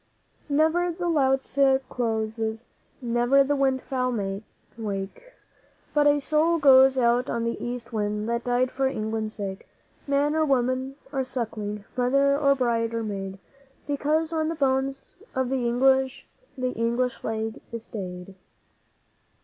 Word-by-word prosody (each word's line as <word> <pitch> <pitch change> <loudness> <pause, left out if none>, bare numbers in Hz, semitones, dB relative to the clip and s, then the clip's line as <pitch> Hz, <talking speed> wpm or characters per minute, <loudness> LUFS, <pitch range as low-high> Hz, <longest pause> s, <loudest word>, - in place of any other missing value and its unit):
'Never 320 +4 +2
the 350 +1 -3
lotus 270 -3 +1 0.3
closes, 225 -1 -2 0.4
never 240 +3 +3
the 290 +1 0
wild 265 -2 +1
fowl 230 -7 -2 0.3
wake, 215 - -6 0.6
But 295 -1 +4
a 290 0 +4
soul 310 +4 +2
goes 265 -2 +6
out 245 0 +2
on 235 -1 -1
the 230 0 -3
East 245 0 -5
Wind 210 0 -1
that 235 0 -1
died 250 +1 +1
for 270 0 0
England's 220 -3 -3
sake 195 -2 -6 0.4
Man 285 +1 +2
or 315 - +3
woman 260 -1 0 0.2
or 270 -2 0
suckling, 215 -5 -4
mother 275 +3 +3
or 280 -1 +3
bride 230 -3 0
or 230 - -1
maid 195 -2 -5 0.5
Because 305 +3 0
on 315 -1 0
the 330 - -2
bones 270 -1 -1 0.2
of 260 -1 0
the 255 -2 0
English 265 +2 +2 0.3
the 255 -1 -1
English 240 +2 0
Flag 220 0 -4
is 230 -1 -6
stayed. 185 -4 -7
255 Hz, 140 wpm, -26 LUFS, 225-275 Hz, 0.6 s, goes